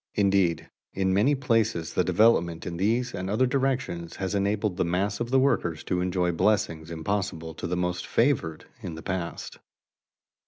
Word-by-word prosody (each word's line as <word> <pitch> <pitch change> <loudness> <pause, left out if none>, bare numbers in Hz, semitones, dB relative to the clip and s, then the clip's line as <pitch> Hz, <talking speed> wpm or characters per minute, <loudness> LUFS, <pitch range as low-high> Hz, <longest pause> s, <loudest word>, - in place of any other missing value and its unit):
Indeed, 95 -5 +2 0.3
in 95 -1 +1
many 125 +10 +3
places 115 - 0
the - - +2
development 85 -7 +3
in 85 -1 -4
these 115 +6 0
and 95 0 -4
other 110 +6 +2
directions 130 -10 -1
has 95 +1 -3
enabled 100 -1 0
the - - +2
mass 95 +4 -1
of 120 0 -2
the 135 - +3
workers 90 - +1
to 90 -1 -1
enjoy 90 -1 0
blessings 85 -3 0
impossible 80 -1 -3
to - - -5
the 90 - -2
most 90 0 -2
favored 115 - +1 0.2
in 85 -4 -6
the 80 - -9
past. 90 -2 -4
95 Hz, 165 wpm, -26 LUFS, 85-110 Hz, 0.3 s, many